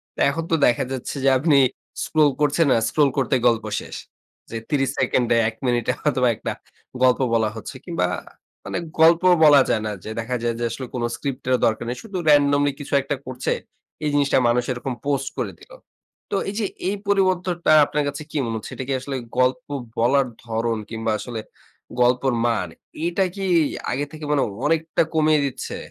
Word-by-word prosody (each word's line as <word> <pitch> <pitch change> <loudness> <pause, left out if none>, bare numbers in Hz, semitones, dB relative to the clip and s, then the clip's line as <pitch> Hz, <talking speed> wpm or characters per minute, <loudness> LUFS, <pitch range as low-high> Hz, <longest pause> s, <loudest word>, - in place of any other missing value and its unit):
তা - - -11
এখন 165 +4 -2
তো - - +5
দেখা 120 - +3
যাচ্ছে 130 +1 -4
যে - - +6
আপনি 145 +1 +3 0.5
স্ক্রল 155 -2 +3
করছেন 150 +2 +3
আ - - +3
স্ক্রল 150 -2 +3
করতে 135 -1 +2
গল্প 115 -2 +1
শেষ। - - -9 0.5
যে 115 - -4
৩০ 135 -4 +1
সেকেন্ডে 125 -2 +2
১ 110 - -12
মিনিটে 120 -2 +1
হয়তোবা 130 -4 +2
একটা - - -4 0.5
গল্প 125 -1 +4
বলা 110 -2 +2
হচ্ছে। 110 - -8
কিংবা - - 0 0.6
মানে - - -3 0.2
গল্প 165 +1 +6 0.2
বলা 145 -3 +8
যায় 110 - +1
না, - - -2
যে - - -7
দেখা 120 +3 -2
যায় 120 -1 0
যে - - -2
আসলে 130 +3 -5
কোন 120 - -2
স্ক্রিপ্ট 135 -2 -5
এরও 130 -1 +3
দরকার 110 +1 0
নেই। 125 - -3
শুধু 205 -4 -6
randomly 145 -1 +4
কিছু 145 - -7
একটা 140 +2 -2
করছে, 130 0 -2 0.5
এই 150 - +1
জিনিসটা 145 -1 +3
মানুষ 120 +1 +2
এরকম 125 +1 -3
পোস্ট 140 -2 0
করে - - -2
দিলো। - - -15 0.6
তো - - 0
এই 200 - -6
যে 215 - 0 0.2
এই 200 - -1
পরিবর্তনটা 185 -4 +1
আপনার 150 +1 -1
কাছে 145 - -4
কি 155 - -3
মনে 115 -1 -3
হচ্ছে? 110 - -8
এটা 130 - -5
কি - - +1
আসলে 135 +1 -5 0.2
গল্প 130 +7 +2 0.3
বলার 130 +3 +3 0.2
ধরন 115 0 -1
কিংবা 115 0 -2
আসলে 120 -3 -5 0.6
গল্পর 125 +2 +3
মান, 115 -6 0 0.4
এটা 175 +3 +1
কি 195 -1 -3 0.5
আগে 135 +3 -1
থেকে 155 -1 -8
মানে 145 -2 +3 0.2
অনেকটা 165 0 +1
কমিয়ে 155 -1 +3
দিচ্ছে? 135 - -5
135 Hz, 185 wpm, -22 LUFS, 120-150 Hz, 0.6 s, বলা